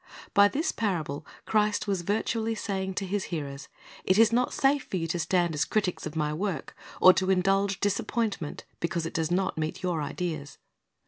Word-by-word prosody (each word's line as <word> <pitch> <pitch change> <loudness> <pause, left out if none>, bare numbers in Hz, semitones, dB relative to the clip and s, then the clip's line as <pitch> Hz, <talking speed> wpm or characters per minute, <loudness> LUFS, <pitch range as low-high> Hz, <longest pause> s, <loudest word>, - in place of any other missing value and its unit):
By 200 0 +7
this 305 - -1
parable 160 -9 -2 0.2
Christ 210 -1 +1
was 195 -3 0
virtually 225 +4 -1
saying 190 -3 -3
to 195 - -2
His 195 +1 -2
hearers, 145 -4 -5 0.4
It 185 - +3
is 225 0 +6
not 245 +1 +2
safe 275 +1 +2
for 190 - -3
you 165 - -1
to 165 +2 -2
stand 175 0 +1
as 150 - +1
critics 195 -7 -1
of 155 - -8
My 150 -1 0
work, 170 -3 -3 0.2
or 185 - +9
to 185 +1 0
indulge 195 +1 +2
disappointment 205 -4 -1 0.2
because 170 -1 -1
it 165 - -5
does 160 -1 0
not 185 -2 0
meet 155 +3 -3
your 175 -4 0
ideas. 155 -2 -4
185 Hz, 185 wpm, -28 LUFS, 165-205 Hz, 0.4 s, or